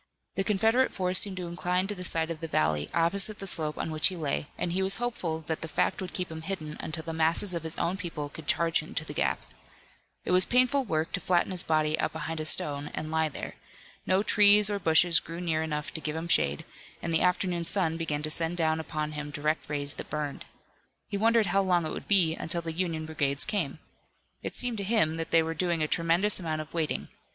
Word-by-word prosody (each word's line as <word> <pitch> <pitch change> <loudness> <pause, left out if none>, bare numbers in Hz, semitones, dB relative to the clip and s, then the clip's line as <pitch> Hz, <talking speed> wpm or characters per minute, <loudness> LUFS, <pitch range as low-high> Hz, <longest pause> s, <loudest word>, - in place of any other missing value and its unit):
The 195 - -1
Confederate 225 +6 +2
force 185 0 +3
seemed 195 -2 +3
to 180 - -4
incline 180 +2 -1
to 205 - -3
the 180 -2 -7
side 165 -2 +1
of 160 - -6
the 165 - -5
valley, 75 - 0
opposite 195 +5 +3
the 195 - -7
slope 155 -5 -1
on 160 - -3
which 155 0 +3
he 190 - -4
lay, 150 -3 -2
and 175 - -2
he 185 +2 0
was 190 +1 +5
hopeful 185 -10 -3
that 160 0 -4
the 165 - -4
fact 155 - -1
would 185 -2 -5
keep 180 -2 -3
him 160 0 -7
hidden 160 -4 -5
until 160 0 -5
the 165 - -5
masses 165 +4 +3
of 170 - -2
his 160 0 -6
own 175 +3 -1
people 165 -6 -5
could 150 +1 -12
charge 165 0 +2
into 155 0 -5
the 150 - -6
gap. - - -1 0.8
It - - -2
was 185 0 +5
painful 255 +2 +3
work 160 -5 -1
to 180 - -1
flatten 180 +1 +1
his 180 -2 +2
body 155 0 0
out - - -1
behind 165 0 -4
a 155 - 0
stone 145 -2 +2
and 155 0 -5
lie 160 -1 +1
there. - - -7 0.5
No 190 +2 +2
trees 210 0 +5
or 200 - -1
bushes 165 -1 +4
grew 165 +1 -8
near 165 -3 -1
enough 150 -1 -3
to 160 - -5
give 155 0 -3
him 165 +1 -4
shade, 70 - +1 0.4
and 165 - -1
the 160 - +3
afternoon 180 -1 +1
sun 165 -2 +2
began 150 -3 -3
to 155 - -2
send 165 +2 +2
down 160 -1 +1
upon 155 -1 -4
him 150 -1 -6
direct 150 +2 -2
rays 145 -1 +1
that - - -9
burned. 150 -2 -4 0.6
He - - -4
wondered 225 +1 +3
how 195 +1 +2
long 180 -3 +1
it 155 - -4
would - - -7
be 175 -6 +5
until 170 +1 -2
the 165 -1 -4
Union 165 -2 -2
brigades 145 -3 0
came. 175 -9 -2 0.6
It - - -6
seemed 245 -3 -2
to - - -2
him 190 -7 +1
that 165 - -4
they 165 -1 +4
were 165 0 -3
doing 170 -1 0
a - - 0
tremendous 170 +7 +2
amount 160 -3 -3
of 155 - -11
waiting. 165 -3 -2
165 Hz, 235 wpm, -28 LUFS, 155-185 Hz, 0.8 s, was